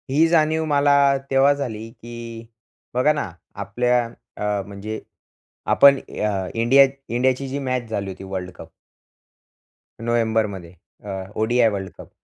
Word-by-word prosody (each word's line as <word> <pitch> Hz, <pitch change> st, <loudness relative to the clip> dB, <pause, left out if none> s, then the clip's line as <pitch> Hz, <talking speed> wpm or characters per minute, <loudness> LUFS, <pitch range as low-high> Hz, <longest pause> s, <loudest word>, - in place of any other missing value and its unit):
ही 150 Hz, +5 st, +4 dB
जाणीव 160 Hz, -1 st, +2 dB
मला 145 Hz, -1 st, +3 dB, 0.4 s
तेव्हा 135 Hz, +1 st, +5 dB
झाली, 115 Hz, -6 st, -5 dB
की 115 Hz, -1 st, -9 dB, 0.5 s
बघा 130 Hz, +5 st, +3 dB
ना 145 Hz, -11 st, -3 dB, 0.3 s
आपल्या 120 Hz, +5 st, +1 dB, 0.3 s
अ, 105 Hz, -1 st, -1 dB
म्हणजे 100 Hz, +2 st, -6 dB, 0.7 s
आपण 140 Hz, -1 st, +7 dB
अ, 100 Hz, -6 st, -3 dB
इंडिया 120 Hz, +5 st, +6 dB, 0.2 s
इंडियाची 130 Hz, +3 st, 0 dB
जी 135 Hz, +2 st, -3 dB
मॅच 130 Hz, -3 st, -2 dB
झाली 100 Hz, -3 st, -3 dB
होती 95 Hz, -, -9 dB
वर्ल्ड 95 Hz, -1 st, -5 dB
कप -, -, -11 dB, 1.3 s
नोव्हेंबरमध्ये 110 Hz, -6 st, -1 dB, 0.3 s
अ, 105 Hz, -, -8 dB, 0.3 s
ओ-डी-आय 115 Hz, +2 st, +3 dB
वर्ल्ड 95 Hz, -2 st, -4 dB
कप, -, -, -12 dB
120 Hz, 130 wpm, -22 LUFS, 105-135 Hz, 1.3 s, आपण